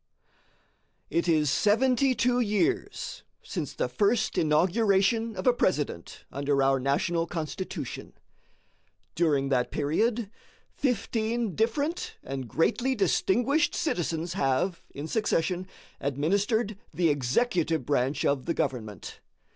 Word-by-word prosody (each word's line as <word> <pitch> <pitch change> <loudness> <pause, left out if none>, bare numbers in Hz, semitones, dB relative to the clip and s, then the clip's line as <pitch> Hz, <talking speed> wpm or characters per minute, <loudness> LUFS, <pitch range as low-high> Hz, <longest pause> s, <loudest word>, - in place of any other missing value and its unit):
It 170 +1 +1
is 155 -4 +3
seventy 255 - +3
two 245 +1 +2
years 245 - -1 0.2
since - - -4
the - - 0
first 215 +1 +1
inauguration 195 +7 +2
of 185 - -5
a 250 - +5
President 150 - -2
under 140 0 +1
our 135 0 +3
national 165 +6 0
Constitution. 160 - -5 1.0
During 145 -5 +1
that 125 -2 +1
period 210 +9 0 0.4
fifteen 230 -3 -1
different 285 - -1
and 135 -1 -5
greatly 240 - +1
distinguished 240 - +2
citizens 170 - -1
have, 170 +3 0
in 145 +2 -7
succession, 185 -3 0 0.3
administered 200 - 0
the 170 -2 +2
executive 160 - +1
branch 140 +1 0
of 140 0 0
the 170 - 0
government. 110 - -4
180 Hz, 105 wpm, -28 LUFS, 145-225 Hz, 1.0 s, a